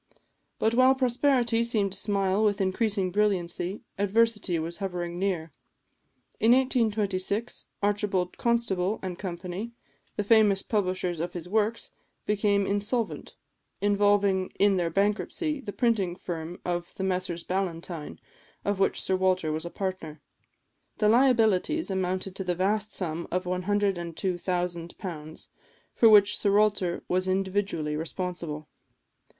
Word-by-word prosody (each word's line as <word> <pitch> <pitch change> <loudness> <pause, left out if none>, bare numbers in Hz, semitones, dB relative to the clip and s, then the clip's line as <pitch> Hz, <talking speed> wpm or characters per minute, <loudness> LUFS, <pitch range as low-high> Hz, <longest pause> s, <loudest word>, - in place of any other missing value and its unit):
But 220 - +1
while 255 +2 +5
prosperity 250 -2 +2
seemed 215 -4 +1
to 190 - -4
smile 200 0 +1
with 205 -2 +2
increasing 195 0 0
brilliancy, 190 -2 -1 0.2
adversity 210 -2 +2
was 165 +2 -4
hovering 175 -3 -4
near. 180 -5 -1 0.9
In 230 +2 +5
1826, 220 -4 0 0.2
Archibald 200 -3 0
Constable 220 -5 0
and 185 -1 -5
Company, 185 +4 -5 0.4
the 210 - -1
famous 205 -2 +4
publishers 185 -5 -1
of 175 +2 -3
his 175 -1 -6
works, 220 +3 -1 0.3
became 205 -1 +2
insolvent, 205 +4 -2 0.4
involving 205 -2 +2
in 200 -1 +4
their 175 -2 0
bankruptcy 210 - -1
the 205 - -6
printing 205 -7 +1
firm 170 -1 -6
of 175 -1 -3
the 190 - -4
Messrs 180 -2 -2
Ballantyne, 170 - -4 0.5
of 205 -1 0
which 195 - +2
Sir 190 - 0
Walter 185 -3 +1
was 155 +2 -3
a - - -5
partner. 185 -5 -5 0.8
The 210 - +3
liabilities 235 - +3
amounted 185 0 -2
to 190 - -3
the 180 -1 -1
vast 210 +3 0
sum 170 -2 -3
of 180 +1 -1
£102,000, 180 -3 -2 0.5
for 230 - +6
which 205 -1 +6
Sir 200 - +2
Walter 205 -5 +1
was 185 +1 0
individually 190 -5 -1
responsible. 165 -2 -4
195 Hz, 125 wpm, -27 LUFS, 180-210 Hz, 0.9 s, for